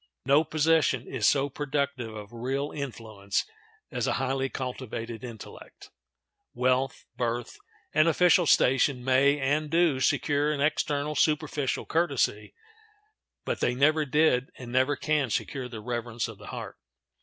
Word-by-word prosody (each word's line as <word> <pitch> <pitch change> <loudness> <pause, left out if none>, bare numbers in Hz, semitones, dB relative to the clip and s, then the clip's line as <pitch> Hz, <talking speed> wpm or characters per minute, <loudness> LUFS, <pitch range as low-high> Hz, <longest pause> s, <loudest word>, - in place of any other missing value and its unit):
No 140 +4 +5
possession 155 -5 +2
is 115 -5 0
so 140 0 +2
productive 140 -5 -3
of 105 +1 -9
real 135 +5 -2
influence 110 -8 -3 0.5
as - - -2
a - - +1
highly 135 0 -1
cultivated 125 -3 -5
intellect. 115 -4 -11 0.6
Wealth, 130 +1 0
birth, 120 -1 -3 0.3
and 155 +2 +4
official 175 +1 +4
station 130 -1 +3
may 135 +3 +3
and 145 +3 0
do 165 -4 +3
secure 145 +2 +1
an 150 - -2
external, 145 0 0
superficial 150 -3 0
courtesy, 140 -10 0 0.9
but - - -2
they 125 - +1
never 155 +4 +3
did 145 -2 +2
and 120 -2 -9
never 130 +3 +2
can 150 -2 0
secure 130 +3 -3
the 115 -3 -8
reverence 120 0 -3
of 110 -3 -10
the 105 - -12
heart. - - -7
135 Hz, 135 wpm, -27 LUFS, 120-150 Hz, 0.9 s, No